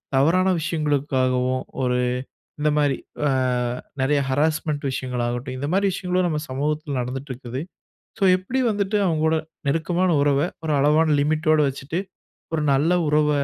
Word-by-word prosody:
தவறான 180 +7 +3
விஷயங்களுக்காகவும், 130 -5 0 0.2
ஒரு 125 0 +1 0.6
இந்தமாரி 150 -2 +2 0.3
அ - - +2 0.7
நெறைய 145 +2 +2
ஹராஸ்மென்ட் 150 +1 0
விஷயங்களாகட்டும், 125 0 -3
இந்தமாரி 180 +9 +1
விஷயங்களும் 180 0 0
நம்ப 150 -2 -1
சமூகத்துல 145 +1 -2
நடந்திட்டு 130 +3 -5
இருக்குது. 125 +1 -6 0.6
சோ - - -8
எப்பிடி 195 +8 -2
வந்துட்டு 205 0 0
அவுங்கோட 160 -1 +2 0.3
நெருக்கமான 170 +5 +1
உறவ, 140 -1 +3 0.3
ஒரு 155 - 0
அளவான 150 +2 +4
லிமிட்டோட 155 +1 +2
வச்சிட்டு 140 +5 -4 0.5
ஒரு 155 - 0
நல்ல 145 +6 +3 0.2
உறவ 150 0 +3
150 Hz, 120 wpm, -23 LUFS, 135-160 Hz, 0.7 s, அளவான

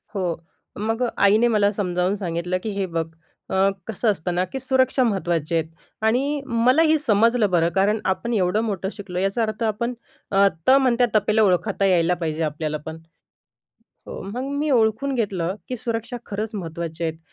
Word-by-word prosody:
हो. 180 -4 -1 0.4
मग 225 +4 -1 0.2
आईने 210 +4 +5
मला 210 -3 +3
समजावून 180 -2 -1
सांगितलं, 180 -2 -2
की 220 - -3
"हे 200 -1 -2
बघ, 165 -2 -2 0.4
अ, 190 +1 +3 0.2
कसं 225 0 +1
असतं 180 -2 -3
ना, 180 - +2
की 265 +9 -6
सुरक्षा 260 0 +2
महत्त्वाची 175 -7 0
आहे." 165 - +2 0.4
आणि, 275 +6 +1
मलाही 260 +7 +3
समजलं 230 -3 +3
बरं, 170 -1 +3
कारण 205 +3 +2
आपण 190 +6 -1
एवढं 195 0 +1
मोठं 195 -4 -2
शिकलो 185 -4 -6
याचा 195 +4 0
अर्थ 220 +1 -3
आपण 230 +3 -1 0.4
अ, 200 0 +5 0.2
त - - +6
म्हणत्या 255 -2 +4
तपेला 215 +1 +3
ओळखता 195 +1 +1
यायला 180 -2 +3
पाहिजे 160 0 -1
आपल्याला 155 0 -2
पण. 160 0 -6 1.1
हो, - - -7
मग 205 +6 -5 0.2
मी 300 +1 0
ओळखून 240 +3 +2
घेतलं, 190 -7 -1
की 255 - -3
सुरक्षा 230 0 -3
खरंच 210 +2 -3
महत्त्वाच्या 170 -3 -4
आहेत. 160 0 -4
205 Hz, 165 wpm, -23 LUFS, 180-230 Hz, 1.1 s, त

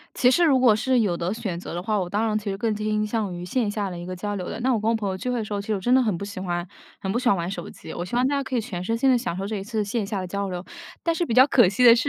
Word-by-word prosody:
其 250 - +5
实 345 +6 +4
如 275 -5 +5
果 245 -4 +6
是 255 +3 +2
有 195 -6 +1
的 170 +2 -2
选 210 -6 -3
择 175 - -7
的 175 - -3
话， 210 +2 0
我 185 -2 -2
当 210 +5 0
然 215 -1 0
其 210 -1 -4
实 195 - -2
更 220 0 0
倾 215 0 0
向 210 -3 -2
于 175 0 -6
线 215 +3 0
下 205 -1 -2
的 175 - -6
一 175 - -6
个 185 0 -5
交 205 +3 -3
流 185 -3 -4
的。 - - -5
那 260 +2 +2
我 220 - 0
跟 220 +2 +1
我 - - +2
朋 210 -2 -2
友 190 - -2
聚 250 +7 -3
会 250 - 0
的 225 - -2
时 210 - -7
候， 200 - -1
其 200 - -9
实 215 - +1
我 195 - -2
真 245 +6 +3
的 260 - +5
很 215 -7 0
不 200 - -5
喜 200 -2 -6
欢 175 -1 -2 0.3
很 190 - -3
不 235 - +1
喜 250 - +1
欢 200 - +4
玩 170 0 -2
手 175 -3 -5
机。 - - -10
我 175 - -4
希 180 +7 -4
望 250 +1 +3
大 285 - +1
家 280 - 0
可 260 -1 -3
以 - - +2
全 180 -5 -5
身 225 +5 -1
心 265 +3 +3
地 255 - +5
享 230 -8 -3
受 195 +1 -3
这 215 +1 -3
一 195 - -4
次 215 0 -1
线 205 +1 -2
下 200 -1 -2
的 185 - -4
交 200 +2 -3
流。 180 0 -5 0.4
但 335 - +1
是 345 - 0
比 235 - -2
较 255 +2 +8
可 240 -8 +5
惜 200 +7 +2
的 235 -1 +10
是 255 +4 0
210 Hz, 415 characters per minute, -24 LUFS, 190-240 Hz, 0.4 s, 的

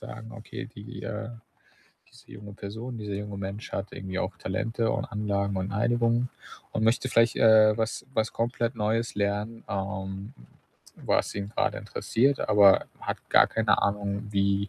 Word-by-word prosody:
sagen: 110 +1 -9
„Okay, 115 -2 -7
die, 105 -2 -10
äh 115 +1 -4 0.8
diese - - -17
junge 100 0 -10
Person, 110 +5 -6
dieser 105 -2 -4
junge 100 0 -5
Mensch 100 +2 -5
hat 100 +1 -4
irgendwie 95 -1 -5
auch 95 0 -2
Talente 110 +6 -1
und - - -1
Anlagen 100 -1 -1
und 95 +1 -2
Einigung 120 +3 +2 0.4
und 110 - -1
möchte 115 +3 +2
vielleicht, 115 -1 +4
äh, 110 -1 +6
was 110 0 -2
was 110 -1 +1
komplett 120 +1 -1
Neues 115 +1 0
lernen, 105 +3 -1
ähm, 95 +1 -4 0.6
was - - 0
ihn 100 0 -4
grade - - 0
interessiert, 135 +4 +1
aber 100 -2 +6
hat - - -3
gar - - +7
keine 110 -2 +2
Ahnung, 100 +1 -1
wie 100 0 +1
105 Hz, 155 wpm, -27 LUFS, 100-115 Hz, 0.8 s, gar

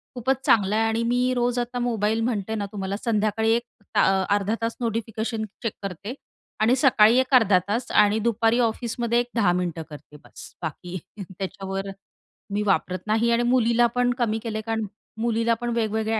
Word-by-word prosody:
खूपच 260 +2 0
चांगला 205 -2 +3
आहे 225 +1 +2
आणि 225 +1 0
मी 250 +1 +2
रोज 245 0 0
आता 245 +1 -3
मोबाईल 225 -2 0
म्हणते 220 -2 -1
ना 205 -1 -2
तुम्हाला, 195 -1 -3
संध्याकाळी 220 0 +1
एक 235 - -1 0.3
अ, 190 0 +3
अर्धा 205 +2 +1
तास 230 0 -2
नोटिफिकेशन 225 -1 -2 0.2
चेक 225 - -1
करते 195 +5 -5 0.5
आणि 235 +4 +4
सकाळी 245 -3 +5
एक, 260 +1 -1
अर्धा 205 -6 +5
तास 230 +5 -2
आणि 210 +1 +4
दुपारी 230 +1 +2
ऑफिसमध्ये 235 0 0
एक 245 - -1
10 200 -6 +3
मिनिटं 175 -3 -2
करते 150 0 -12
बस. - - -13
बाकी 175 +3 -5 0.2
त्याच्यावर 195 +1 -5 0.6
मी 205 - 0
वापरत 185 -2 +1
नाही 225 +2 +2
आणि 235 +1 +2
मुलीला 240 -1 +3
पण 245 0 +2
कमी 225 -2 0
केलंय, 220 -1 -3
कारण 225 -1 -1 0.4
मुलीला 230 0 +1
पण 240 - -2
वेगवेगळ्या 220 -1 0
225 Hz, 170 wpm, -24 LUFS, 205-235 Hz, 0.6 s, सकाळी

